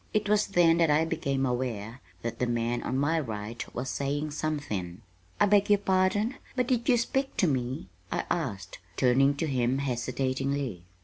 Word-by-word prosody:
It 210 -1 +2
was 210 0 +3
then 175 -4 +4
that 165 -2 +4
I 150 +2 +4
became 135 -4 -1
aware 120 -2 -3 0.2
that 115 0 -4
the 125 - +1
man 120 0 0
on 130 - -2
my 155 +4 +2
right 110 -3 -4
was 125 +2 -3
saying 145 +2 -2
something. 115 - -3 0.4
"I - - +6
beg 205 0 +4
your 205 - +6
pardon, 200 +5 +1 0.2
but 250 -1 +1
did 245 0 0
you 245 - +6
speak 270 +3 -1
to - - +3
me?" 130 -6 -2 0.2
I - - -1
asked, 100 - -3 0.2
turning 135 +3 +4
to 165 - -1
him 130 -3 +1
hesitatingly. 130 -4 -2
140 Hz, 175 wpm, -28 LUFS, 120-175 Hz, 0.4 s, I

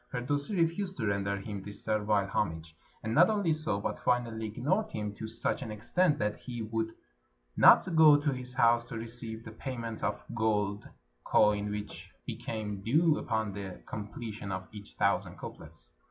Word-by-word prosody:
Firdusi 145 - -1
refused 180 +3 0
to 115 - -1
render 100 -1 0
him 100 0 -5
this 100 +1 -8
servile 105 -2 +1
homage, 80 -5 -2 0.3
and 110 +1 -2
not 170 - +7
only 205 -7 +2
so, 155 -10 -1
but - - -3
finally 115 -3 0
ignored 145 - 0
him 105 -1 -3
to 110 +2 -6
such 115 +1 -2
an - - -5
extent 145 - +1
that 105 -3 -1
he 120 -3 -6
would 110 +1 -2 0.6
not 180 -3 +7
go 155 -2 +8
to 145 0 0
his 125 0 -7
house 115 -1 +4
to 115 - -6
receive 115 0 -6
the 115 - -7
payment 115 -2 -5
of - - -1
gold 105 -3 0 0.3
coin 105 -1 +3
which 105 0 -6 0.2
became 105 -3 -4
due 155 - +3
upon 110 -3 -1
the 95 -2 -6
com 105 -2 -5
pletion 105 -2 -6
of 95 0 -4
each 105 -1 -11
thousand - - +1
couplets. - - -9
110 Hz, 170 wpm, -31 LUFS, 105-130 Hz, 0.6 s, go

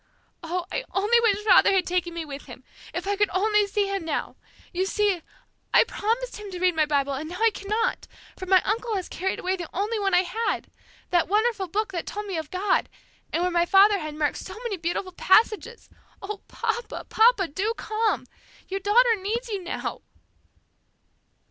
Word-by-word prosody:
"Oh, 345 +1 -3
I - - -2
only 420 +5 +4
wish 420 -3 +1
father 430 - +6
had 375 -2 +2
taken 350 -1 -1
me 335 -1 -4
with 285 -1 -8
him! - - -12 0.3
If - - -4
I 405 +1 0
could 415 0 +2
only 420 +1 +3
see 405 0 0
him 395 -2 -3
now! 320 -2 -3 0.4
You 370 +2 0
see, 405 -4 +1 0.5
I - - +8
promised 470 +4 -2
him 420 -1 -8
to 365 -2 -6
read 365 -1 +2
my 310 -1 +2
Bible 280 -1 +1
and 300 +4 -5
now 360 - -6
I 455 0 +4
cannot, 430 +4 -2 0.3
for 375 - -8
my 375 -1 +5
uncle 450 +2 -1
has 375 -3 -3
carried 380 +2 -2
away 370 +1 -1
the 345 -3 -6
only 420 +4 -1
one 390 -2 +2
I 360 - +5
had 440 +5 -2 0.4
that 350 -2 +3
wonderful 425 0 +1
Book 425 +5 -1
that 345 -3 -4
told 420 +1 -5
me 390 -3 -4
of 315 -2 -4
God, 375 +1 0 0.4
and 340 - 0
where 360 - +1
my 345 0 +2
father 400 +2 +6
had 310 -2 -6
marked 300 -1 0
so 375 - -8
many 465 -4 -2
beautiful 350 +2 -3
passages! 435 +5 +2 0.3
Oh, 400 +1 -6
papa, 475 - -3
papa, 445 -4 +4
do 415 +9 -1
come! 435 0 -1 0.4
Your 390 +1 -2
daughter 455 +4 +4
needs 455 +5 -3
you 400 -4 -3
now!" 345 - -4
390 Hz, 190 wpm, -25 LUFS, 355-430 Hz, 0.5 s, I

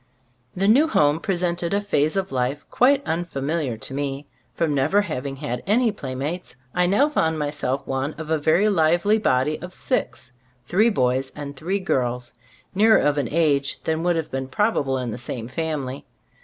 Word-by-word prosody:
The 195 +2 +1
new 270 +9 +5
home 150 - +3
presented 175 -1 -1
a - - +2
phase 155 -7 0
of 195 -1 -1
life 130 +3 -1
quite 275 +2 +3
unfamiliar 155 -5 -2
to 125 - -5
me. 140 0 -3 0.3
From 160 -3 0
never 145 +9 +3
having 140 -8 -4
had 135 -4 -4
any 225 +3 +3
playmates, 145 0 -5 0.2
I 180 0 +2
now 205 +11 +4
found 160 - 0
myself 145 -2 -2
one 135 +3 -2
of 160 0 -7
a 160 - +2
very 160 +8 +3
lively 175 +3 +3
body 150 -4 +1
of 180 +1 -8
six 255 - -2 0.2
— 125 -1 -39
three 215 +6 +3
boys 130 - 0
and 145 -1 -7
three 185 +8 -2
girls 125 -8 -1 0.4
nearer 220 +3 +5
of 145 0 +2
an 135 - -1
age 145 -3 +1
than 160 0 -1
would 175 0 +1
have 160 -2 -3
been 135 0 -3
probable 140 -5 0
in 125 -2 -3
the 110 - -6
same 120 -1 -5
family. 140 -1 -3
155 Hz, 180 wpm, -23 LUFS, 135-185 Hz, 0.4 s, new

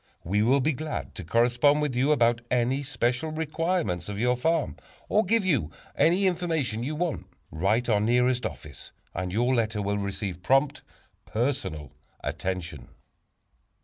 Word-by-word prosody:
We 100 +5 +1
will 130 +5 +4
be 155 +4 +2
glad 155 +3 -5
to - - -7
correspond 120 - +3
with 150 -4 -1
you 135 +4 +2
about 120 -4 +3
any 125 +2 +1
special 130 +1 -1
requirements 155 - -1
of 100 0 -4
your 125 +2 +2
farm, 160 +5 0 0.3
or 215 - +3
give 225 +1 +1
you 135 - +1 0.3
any 180 +5 +3
information 160 - 0
you 150 +4 -3
want. 170 +1 -2 0.2
Write 100 +9 +1
our 105 -3 +3
nearest 125 +3 +2
office 75 -2 -6
(see - - -9
last - - -18
page) 90 - -3
and 90 - -4
your 120 +6 +2
letter 115 -3 0
will 100 +1 -1
receive 100 -2 -4
prompt, 135 +8 +2 0.5
personal 95 - -2 0.3
attention. 85 -7 -4
125 Hz, 160 wpm, -27 LUFS, 105-150 Hz, 0.5 s, will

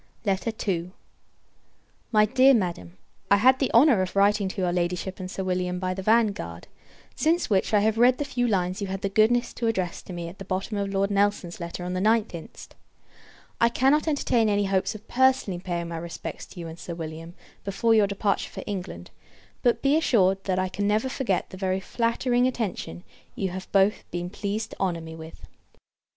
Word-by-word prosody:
II. 195 -3 -1 1.2
My 215 -2 +5
Dear 260 +4 +5
Madam, 170 - -3 0.3
I 200 - +7
had 255 +6 +4
the 270 - 0
honour 240 -4 +6
of 185 +1 -3
writing 200 0 +3
to 190 - -5
your 180 -1 +1
Ladyship 180 +2 -2
and 185 -1 -5
Sir 190 - -4
William, 180 -1 -1
by 185 0 -2
the 190 - -5
Vanguard; 220 0 +1 0.5
since 330 -3 +1
which, 190 -2 +2
I 210 -2 +4
have 220 +1 +1
read 250 +1 +5
the 290 - -2
few 245 -3 -1
lines 185 -3 0
you 200 - -2
had 190 0 -4
the 195 - 0
goodness 220 +4 +2
to 235 - -2
address 185 -6 -1
to - - -11
me 170 -1 -5
at 175 +3 -11
the - - -6
bottom 195 +3 -3
of 200 -1 -2
Lord 195 +1 0
Nelson's 200 -3 0
letter 170 +1 -6
of 180 - -3
the 185 - -1
9th 220 +1 +2
inst. 165 -2 -10 0.9
I 235 - +5
cannot 270 +6 +2
entertain 245 -7 +2
any 205 0 +1
hopes 195 +1 0
of 215 +1 -11
personally 260 -8 +2
paying 175 -2 -4
my 165 - -4
respects 170 0 -7
to 180 - -12
you 170 - -6
and 165 +1 -9
Sir 170 - -6
William, 165 +1 -7 0.3
before 200 +4 +1
your 215 -2 +5
departure 200 0 -1
for - - -8
England; 180 - -6 0.5
but, 240 - +1
be 275 +2 +4
assured, 195 - +2
that 185 -2 0
I 185 0 +1
can 200 +2 -2
never 215 +5 +1
forget 235 -9 -1
the 185 - -8
very 190 0 -1
flattering 240 +4 +1
attention 200 - -4 0.3
you 195 - -2
have 190 +1 -7
both 195 +1 +3
been 175 0 -4
pleased 210 +2 -3
to - - -11
honour 175 -3 -1
me 160 0 -9
with. 160 0 -11
195 Hz, 200 wpm, -26 LUFS, 180-225 Hz, 1.2 s, I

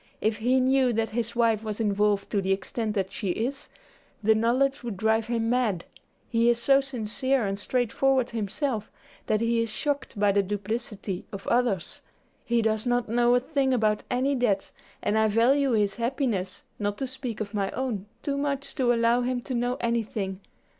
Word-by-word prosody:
If 215 0 0
he 250 +4 +2
knew 260 -1 +3
that 225 0 -1
his 230 +1 -2
wife 225 -2 +2
was 215 -1 -4
involved 205 -1 +1
to 205 - +1
the 190 0 -1
extent 210 +3 -2
that 190 -2 -1
she 200 - -3
is, 245 +9 -2 0.5
the 220 +2 +5
knowledge 250 +5 +2
would 230 -5 -5
drive 220 +2 +1
him 230 -1 0
mad. 225 -9 +1 0.4
He 230 0 +3
is 240 - +3
so 270 +4 +4
sincere 260 0 -1
and 195 0 -2
straightforward 255 +3 +1
himself, 220 +1 -2 0.4
that 215 0 +1
he 230 0 +2
is 230 - -1
shocked 285 -2 -3
by 205 -1 +4
the 200 0 +3
duplicity 205 -1 -4
of 195 -1 -7
others. 235 -7 0 0.4
He 235 -1 +1
does 220 +1 0
not 245 -2 +1
know 240 +1 +4
a - - +5
thing 270 -1 +1
about 215 -3 +1
any 260 +3 +1
debts 225 -7 0 0.3
and 220 - +2
I 220 - +4
value 250 +5 +3
his 205 -3 +2
happiness, 235 -6 -2 0.2
not 205 -1 -1
to 270 - -2
speak 255 -3 -5
of 215 -1 -4
my 200 -2 0
own, 230 -7 -3 0.2
too 280 -2 -1
much 280 -1 -2
to 250 -3 +3
allow 235 +1 +3
him 250 0 -1
to 260 - -5
know 245 +1 0
anything. 220 -5 -1
230 Hz, 185 wpm, -27 LUFS, 210-250 Hz, 0.5 s, the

